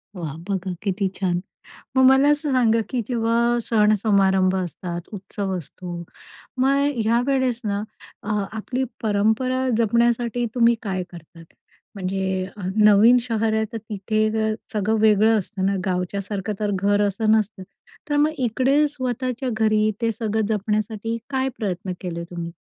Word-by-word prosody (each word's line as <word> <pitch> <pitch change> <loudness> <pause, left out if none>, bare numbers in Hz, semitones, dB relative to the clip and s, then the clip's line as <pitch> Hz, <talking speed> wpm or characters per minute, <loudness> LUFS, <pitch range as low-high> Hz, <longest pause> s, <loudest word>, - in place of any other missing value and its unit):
वाह! 160 -5 -5
बघा 190 -1 -2
किती 195 -1 -1
छान. 180 -2 0 0.6
मग 260 - +6
मला 270 +2 +5
असं 295 0 0
सांगा 230 -3 +3
की 250 - -1
जेव्हा 235 0 +1
सण 215 -2 +3
समारंभ 190 -3 +3
असतात, 175 -1 -4
उत्सव 195 -1 -4
असतो. 175 +1 -7 0.5
मग 275 +2 +3
ह्या 230 +1 +2
वेळेस 260 -3 +1
ना 205 -1 -1 0.4
अ, 210 - -6 0.2
आपली 250 +4 -3 0.2
परंपरा 220 +5 +1
जपण्यासाठी 235 +1 +1
तुम्ही 235 -1 +4
काय 190 -3 -2
करतात? 165 0 -13 0.5
म्हणजे 190 0 -2
अ, 205 - -8
नवीन 210 +3 +6
शहर 225 -2 -1
आहे 220 0 +1
तर - - -2
तिथे 215 0 -1
अगर 220 0 0 0.2
सगळं 215 +1 +1
वेगळं 220 +1 +5
असतं 190 0 -4
ना, 200 +1 +1
गावच्यासारखं 195 +3 -2
तर 210 -1 0
घर 205 +2 +2
असं 215 +2 0
नसतं. 215 -3 +1 0.5
तर 290 - +1
मग 300 +1 +3
इकडे 265 +4 +2
स्वतःच्या 255 -2 -3
घरी 215 -1 +2
ते 230 -1 +2
सगळं 220 -1 -1
जपण्यासाठी 215 +1 -1
काय 265 -1 0
प्रयत्न 185 -3 -3
केले 170 -2 -4
तुम्ही? 170 -1 -5
215 Hz, 145 wpm, -23 LUFS, 195-235 Hz, 0.6 s, मग